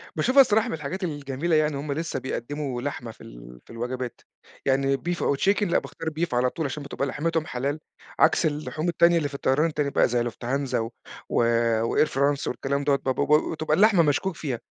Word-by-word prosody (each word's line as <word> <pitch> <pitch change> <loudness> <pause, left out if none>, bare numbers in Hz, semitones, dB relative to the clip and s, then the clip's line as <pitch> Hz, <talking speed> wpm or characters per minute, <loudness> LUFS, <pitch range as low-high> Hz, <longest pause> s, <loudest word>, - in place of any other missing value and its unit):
باشوفها 270 +2 +5
الصراحة 220 -2 +3
من - - -3
الحاجات 160 +5 -5
الجميلة 145 0 -1
يعني 155 -1 +3
إن - - -5
هُم 140 +1 -4
لسه 160 -3 -3
بيقدِّموا 130 0 -4
لحمة 125 -4 -5
في - - -19
ال - - -12
في - - -13
الوجبات، 125 +1 -5 0.4
يعني 135 0 +2
beef 175 +4 -3
أو 140 - +2
chicken، 200 +5 +2
لأ 175 - +2
باختار 165 -1 -9
beef 170 -5 -1
على 125 +1 +2
طول 160 +1 -4
عشان 140 +2 -4
بتبقى 140 0 -3
لحمتهُم 160 +3 -1
حلال، 140 +5 -3 0.4
عكس 160 +1 +4
اللحوم 155 +2 -2
التانية 170 0 +4
اللي 150 -3 0
في - - -16
الطيران 140 +3 +2
التاني 150 -3 -1
بقى - - +3
زي 120 0 0
Lufthansa 130 +4 -3
و 115 0 0 0.9
وAir 135 +6 +2
France 140 +1 0
والكلام 140 +3 -2
دوّة، 140 -1 +3
با 135 -1 -1
ب 150 +3 +2
بتبقى 155 -1 0
اللحمة 205 -4 +5
مشكوك 165 +5 0
فيها، 135 -8 -4
145 Hz, 200 wpm, -25 LUFS, 130-165 Hz, 0.9 s, باشوفها